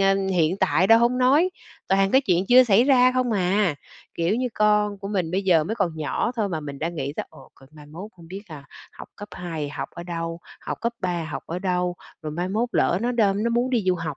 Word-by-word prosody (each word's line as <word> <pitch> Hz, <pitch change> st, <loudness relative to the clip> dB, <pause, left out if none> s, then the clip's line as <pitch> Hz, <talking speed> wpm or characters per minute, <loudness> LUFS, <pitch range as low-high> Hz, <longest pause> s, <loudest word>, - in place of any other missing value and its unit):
ờ, 195 Hz, 0 st, +4 dB, 0.2 s
hiện 170 Hz, +1 st, +1 dB
tại 190 Hz, -1 st, +2 dB
đâu 225 Hz, +2 st, +7 dB
hông 240 Hz, +2 st, +2 dB
nói, 275 Hz, +8 st, +4 dB, 0.4 s
toàn 195 Hz, 0 st, +2 dB
cái 265 Hz, -, +5 dB
chuyện 185 Hz, -6 st, 0 dB
chưa 255 Hz, +1 st, +7 dB
xảy 225 Hz, +2 st, +4 dB
ra 255 Hz, -2 st, +5 dB
không 255 Hz, -2 st, 0 dB
à, 190 Hz, -3 st, +1 dB, 0.4 s
kiểu, 170 Hz, +6 st, 0 dB
như 250 Hz, 0 st, -1 dB
con 210 Hz, -1 st, +2 dB
của 195 Hz, -, -7 dB
mình 185 Hz, -5 st, -2 dB
bây 190 Hz, +2 st, -1 dB
giờ 170 Hz, -5 st, +3 dB
mới 220 Hz, -, -3 dB
còn 170 Hz, -8 st, -2 dB
nhỏ 155 Hz, +9 st, -2 dB
thôi 210 Hz, -3 st, 0 dB
mà 160 Hz, -3 st, -3 dB
mình 140 Hz, -2 st, -8 dB
đã 165 Hz, -, -1 dB
nghĩ 145 Hz, -4 st, -4 dB
tới, -, -, -4 dB
ồ, -, -, -16 dB
rồi 135 Hz, -, -17 dB
mai 150 Hz, -1 st, -14 dB
mốt 175 Hz, +8 st, -9 dB
hông 165 Hz, -1 st, -15 dB
biết 195 Hz, +2 st, -7 dB
ha, 150 Hz, -3 st, -10 dB, 0.3 s
học -, -, -11 dB
cấp 205 Hz, 0 st, -9 dB
2 165 Hz, -4 st, -5 dB
học -, -, -5 dB
ở 170 Hz, -, -7 dB
đâu, 165 Hz, -1 st, -5 dB, 0.2 s
học -, -, -5 dB
cấp 235 Hz, 0 st, -1 dB
3 175 Hz, -3 st, -2 dB
học 155 Hz, -, -6 dB
ở 170 Hz, -, -4 dB
đâu, 180 Hz, -1 st, -1 dB, 0.3 s
rồi 155 Hz, -, -4 dB
mai 175 Hz, +4 st, -3 dB
mốt 225 Hz, +5 st, -1 dB
lỡ 175 Hz, -, +2 dB
nó 245 Hz, +1 st, 0 dB
đơm 205 Hz, -3 st, +1 dB
nó 235 Hz, -, +1 dB
muốn 240 Hz, +2 st, 0 dB
đi 230 Hz, -6 st, 0 dB
du 185 Hz, -, +3 dB
học 160 Hz, -5 st, -5 dB
190 Hz, 255 wpm, -23 LUFS, 165-225 Hz, 0.4 s, đâu